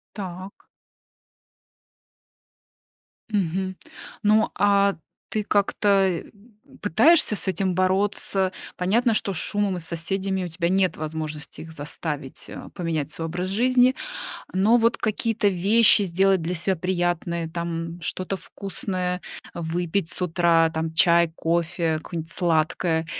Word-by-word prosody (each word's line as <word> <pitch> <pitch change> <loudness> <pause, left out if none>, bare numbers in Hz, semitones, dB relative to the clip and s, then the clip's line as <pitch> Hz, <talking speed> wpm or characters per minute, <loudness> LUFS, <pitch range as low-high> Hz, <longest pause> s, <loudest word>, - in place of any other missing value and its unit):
Так. 190 -1 -8 2.6
Мгм. 190 -2 -1 0.5
Ну, 215 +1 +3
а 200 -1 +3 0.3
ты 215 - -1
как-то, 205 0 0
э, 195 -3 +3 0.6
пытаешься 290 - +4
с 200 - -4
этим 190 -1 -1
бороться? 190 0 +1 0.3
Понятно, 225 +6 +2
что 200 -2 0
с - - -3
шумом 205 +1 0
и - - -4
с - - -5
соседями 190 +3 -2
у - - -3
тебя 170 +1 -1
нет 190 0 +2
возможности 155 -1 -5
их 160 - -10
заставить, 145 -2 -5
а, - - -9
поменять 160 -5 -2
свой 165 +2 -3
образ 180 +3 -3
жизни. 250 +5 +3 0.6
Но 200 +6 +4
вот 230 0 +2
какие-то 220 -1 +1
вещи 205 +4 +5
сделать 190 0 +2
для 170 +3 -2
себя 185 +3 0
приятное, 175 -1 -1
там: 165 0 -4
что-то 185 +4 -3
вкусное 185 -2 -4 0.3
выпить 170 +1 -1
с - - +2
утра, 165 -1 +3
там, 160 0 -3
чай, 170 0 +4
кофе, 170 -1 0
какое-нибудь 160 0 -5
сладкое, 165 0 +1
180 Hz, 125 wpm, -24 LUFS, 165-200 Hz, 2.6 s, вещи